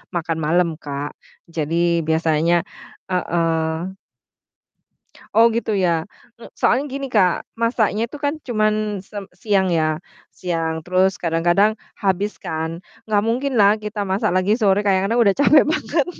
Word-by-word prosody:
makan 165 -1 -1
malem, 170 +3 +2
Kak, 145 0 -5 0.4
jadi 170 +2 0
biasanya 160 +1 +2 0.5
heeh. 165 -1 -1 1.4
Oh 230 +1 +7
gitu 225 -1 -1
ya, 170 -4 +1 0.3
m 235 - -11
soalnya 265 +4 +2
gini, 275 0 -5
Kak, 190 -7 +2 0.2
masaknya 230 -1 +1
itu 290 - -10
kan 290 +1 0
cuman 215 -3 0
sem 205 +1 -8
siang 195 0 +1
ya, 155 -2 +1 0.3
siang 165 -3 -3
terus 185 +1 +2
kadang-kadang 175 +5 +2 0.2
habis 200 +1 -1
kan. 160 +1 -4 0.3
Gak 205 -1 +2
mungkin 250 +3 -1
lah 205 +1 +5
kita 210 -1 -4
masak 190 +2 0
lagi 185 +3 +2
sore 205 -1 +3
kadang-kadang 200 +4 +2
udah 200 -3 +4
capek 290 +1 +5
banget 300 -1 0
190 Hz, 135 wpm, -21 LUFS, 165-220 Hz, 1.4 s, Oh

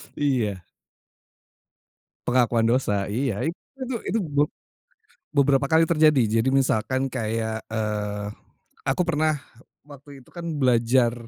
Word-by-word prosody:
Iya. 115 -10 0 1.6
Pengakuan 120 -2 +3
dosa, 105 -5 +1
iya. 115 0 -1
Itu 225 +10 -8
tuh, 240 -4 -3
itu 225 - -1
be 145 -6 +1 0.9
beberapa 140 -1 +3
kali 160 +1 +5
terjadi. 145 -9 +3
Jadi 130 - +1
misalkan 130 -1 +1
kayak, 115 -3 -2
eee, 105 -2 -2 0.6
aku 135 +7 +1
pernah 155 -2 +1 0.5
waktu 140 -1 -13
itu - - -22
kan 170 -1 -7
belajar 120 -2 +3
130 Hz, 110 wpm, -24 LUFS, 110-145 Hz, 1.6 s, kali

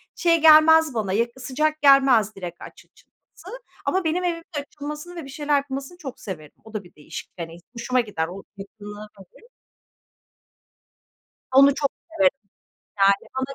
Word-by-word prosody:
şey 335 -2 +2
gelmez 315 -1 +7
bana, 210 -4 -2
yakı 235 +4 -1
sıcak 305 +4 -1
gelmez 265 -7 +5
direkt 175 -3 -8
aç - - -12
açılması - - -15 0.3
ama 375 0 0
benim 325 +3 0
evimde 335 -2 -2 0.2
açılmasını 300 +5 -8
ve 335 - -6
bir 275 - -11
şeyler 295 +1 -1
yapılmasını 275 +4 -5
çok 275 -8 -8
severim, 155 -7 -8
o 220 - -15
da 215 -2 -4
bir 175 - -19
değişik, 150 - -9
hani, 165 0 -7 0.2
hoşuma 250 +2 0
gider, 180 -8 -3
o 190 +3 -9
yakınlığı 205 +1 -10
Hı 195 - -13
hı. 460 - -22 2.1
Onu 275 0 +7
çok 280 -2 0 0.2
severim, 285 -4 +2 0.6
yani, 195 0 +3
bana 265 +1 -3
270 Hz, 155 wpm, -23 LUFS, 205-310 Hz, 2.1 s, gelmez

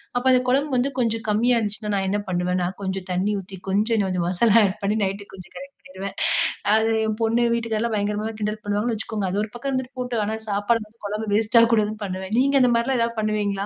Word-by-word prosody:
அப்போ 245 +1 0
அந்த 250 - +4
குழம்பு 280 +3 +1
வந்து 250 +3 +1
கொஞ்சம் 225 -1 -1
கம்மியா 235 +3 +3
இருந்துச்சினா, 210 0 -3
நான் 190 0 -1
என்ன 205 - +1
பண்ணுவேன்னா 180 0 0 0.2
கொஞ்சம் 190 -1 -3
தண்ணீ 190 +4 0
ஊத்தி. 190 0 -11
கொஞ்சம் 215 +2 +2
கொஞ்சம் 180 -2 -1
மசாலா 210 +5 +4
ஆட் 190 - -6
பண்ணி 210 +2 +1
நைட்க்கு 200 +1 -4
கொஞ்சம் 185 - -13
கரெக்ட் 275 +1 -11
பண்ணிடுவன். 190 +1 -8 0.6
அது 220 +1 +2 0.2
என் 215 -1 -2
பொண்ணு 225 +2 +2
வீட்டுக்காரர் 230 -2 -1
எல்லாம் 235 -1 -1
பயங்கரமா 210 +1 -1
கிண்டல் 210 0 -3
பண்ணுவாங்கன்னு 210 +3 -1
வச்சிக்கோங்க. 215 -1 -3
அது 200 - 0
ஒரு 215 - -5
பக்கம் 255 +3 -4
இருந்துட்டு 260 0 -3
போட்டோம். 245 -3 -1
ஆனா, 220 +1 -2
சாப்பாடு 205 +3 +1
வந்து 220 +1 -26
குழம்பு 215 +2 -4
வேஸ்ட் 220 +2 +2
ஆகக்கூடாதுனு 215 -2 +2
பண்ணுவேன். 190 +1 -5
நீங்க 275 +2 +2
அந்த 250 -1 +4
மாரி 235 - +2
எல்லாம் 260 -3 +1
ஏதாவது 230 0 -1
பண்ணுவீங்களா? 205 -2 -1
215 Hz, 215 wpm, -23 LUFS, 200-235 Hz, 0.6 s, அந்த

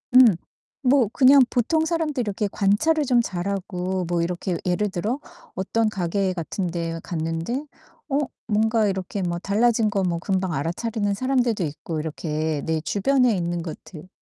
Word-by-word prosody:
음. 245 -8 +8 0.5
뭐 255 -2 +5
그냥 275 +1 +7
보통 315 +7 +1
사람들이 320 -5 -1
이렇게 210 -1 -1
관찰을 290 +11 +2
좀 245 -2 +4
잘하고 185 -1 -3
뭐 170 0 0
이렇게 175 +1 -2
예를 190 +3 +1
들어 210 +9 -2 0.4
어떤 220 +4 0
가게 190 -1 -1
같은 180 +2 -3
데에 165 -1 -3
갔는데 165 - -3 0.4
어 280 0 +2 0.3
뭔가 220 +1 +2
이렇게 190 0 -3
뭐 175 -1 -2
달라진 220 +3 +2
거 200 -1 0
뭐 170 -2 0
금방 190 0 -1
알아차리는 205 - -1
사람들도 245 -3 +1
있고 155 +1 -4
이렇게 155 -1 -2
내 160 -1 0
주변에 245 - +2
있는 175 -1 -2
것들 160 0 -9
195 Hz, 315 characters per minute, -24 LUFS, 170-235 Hz, 0.5 s, 음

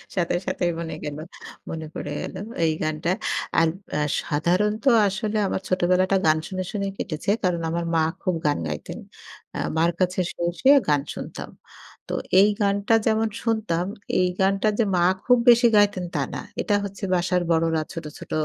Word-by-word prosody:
সাথে, 175 -1 0
সাথেই 180 -1 0
মনে 165 -1 -4
গেল 145 -1 -5 0.5
মনে 160 -1 -5
পড়ে 145 - -5
গেল - - -6 0.3
এই 160 - +3
গানটা। 155 +2 -2 0.5
আর 165 - +4 0.3
আ - - 0 0.2
সাধারণত 185 +8 0 0.2
আসলে 205 +3 -2
আমার - - -2
ছোটবেলাটা 185 +1 +2
গান 155 0 +4
শুনে, 185 -1 -3
শুনেই 200 -2 -2
কেটেছে 160 +2 -4
কারণ 175 -2 +1
আমার 170 +1 -2
মা 165 - +4 0.2
খুব 185 -2 0
গান 145 - +2
গাইতেন। 75 -1 -6 0.6
আ - - -3 0.2
মার 170 +1 +3
কাছে 185 0 +1
শুয়ে, 170 - -4
শুয়ে 275 +2 +6
গান 145 -1 +3
শুনতাম। - - -7 0.6
তো - - -4 0.3
এই 200 +2 +6
গানটা 200 +2 +1
যেমন 220 0 +2 0.2
শুনতাম 215 -7 0 0.3
এই 180 - +3
গানটা 195 +2 +2
যে - - +5
মা 175 - +2 0.2
খুব 250 -1 +5
বেশি 240 0 +7
গাইতেন 205 -3 +3
তা - - -1
না। - - -3 0.2
এটা 210 - 0
হচ্ছে 200 +1 -9
বাসার 180 0 +1
বড়রা 165 -1 +2
ছোট, 165 -3 -6
ছোট - - -12
180 Hz, 170 wpm, -24 LUFS, 165-200 Hz, 0.6 s, বেশি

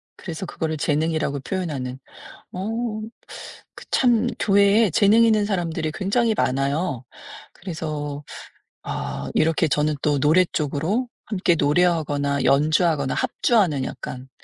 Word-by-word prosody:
그래서 175 +1 -6
그거를 160 -2 -3
재능이라고 150 -1 -1
표현하는. 135 -7 -4 0.5
어. 185 +2 -4 1.1
그 - - -12
참 240 -4 +3
교회에 200 +2 +4
재능 210 +7 +5
있는 215 -2 +3
사람들이 165 -6 -2
굉장히 220 +6 +1
많아요. 140 - -1 0.5
그래서 150 -5 -5 0.6
아 65 +1 -4
이렇게 160 0 +2
저는 150 +1 +1
또 145 -2 +1
노래 160 +6 +4
쪽으로 165 - -1 0.2
함께 185 -5 +1
노래하거나 145 -3 +1
연주하거나 150 0 +2
합주하는 210 - +1
약간 130 0 -7
160 Hz, 285 characters per minute, -23 LUFS, 145-190 Hz, 1.1 s, 재능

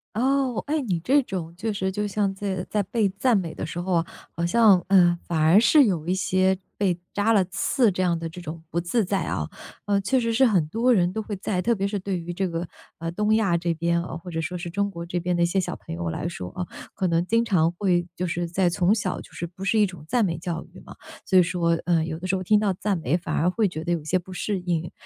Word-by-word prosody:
哦， 260 0 +1
哎， 305 0 0
你 185 -9 -1
这 275 - +3
种 175 -7 -5
确 215 +5 -2
实 190 -2 -1
就 210 +2 -2
像 200 -1 0
在 190 -2 -3
在 210 -1 0
被 215 +2 +1
赞 205 +5 +2
美 170 -4 -3
的 - - -4
时 165 +3 -5
候 180 +1 -2
啊， 165 -1 +2 0.3
好 170 0 -1
像， 200 -1 +5
呃， 175 -3 +5
反 165 -2 -1
而 160 +4 +5
是 265 +5 +6
有 175 -8 -1
一 180 - +1
些 190 0 +2 0.2
被 185 -4 +1
扎 205 +2 +2
了 200 -4 +4
刺 225 +6 +1
这 185 - 0
样 170 -2 +1
的 165 - -4
这 165 +2 -9
种 165 -1 -7
不 170 0 -1
自 205 +5 0
在 190 +1 0
啊， 75 - -2 0.4
呃， 200 -1 +1
确 245 +7 +1
实 230 -1 0
是 265 +3 +5
很 180 -9 +2
多 235 +7 +2
人 180 -3 +2
都 220 - -2
会 210 - -6
在 185 -1 -2
特 235 +4 +2
别 195 -1 -1
是 205 - -2
对 190 -1 -3
于 175 +1 -6
这 190 +1 -1
个， 165 +1 -3 0.3
呃， 165 0 -3
东 210 +3 +1
亚 200 -6 +2
这 170 0 -1
边 170 +1 0
啊， 170 - -6
或 180 +2 -10
者 165 -1 -2
说 180 +3 -4
是 175 0 -5
中 200 +3 -1
国 170 -2 -6
这 175 +1 -3
边 180 +1 -1
的 170 - +3
一 - - +5
些 190 +3 +1
小 - - -4
朋 80 - -8
友 85 -1 -3
来 150 - -3
说 90 - -6
啊， 180 - -3 0.3
可 190 - -1
能 170 0 +1
经 230 +4 +2
常 170 -6 +2
会 175 -1 +1
就 180 +1 -3
是 175 0 -2
在 180 +1 +2
从 180 +3 +2
小， 200 -4 -2
就 - - -15
是 170 - -5
不 180 +3 -11
是 215 +3 +2
一 210 - +5
种 180 -5 -8
赞 240 -4 +3
美 170 -3 -2
教 170 -1 -4
育 - - -12
嘛， - - -12 0.3
所 190 - +3
以 180 - +6
说， 175 -1 -1 0.2
呃， 170 -2 +2
有 160 0 -4
的 185 - -5
时 190 - +1
候 185 - -3
听 210 +3 +4
到 200 -3 +1
赞 195 +1 -1
美， 160 0 0
反 175 -3 -5
而 170 - +2
会 215 +4 +1
觉 160 -3 -6
得 175 - +1
有 165 - -2
些 175 +5 +1
不 185 +1 -11
适 195 +1 -2
应， 170 -2 -2
185 Hz, 295 characters per minute, -25 LUFS, 170-205 Hz, 0.4 s, 是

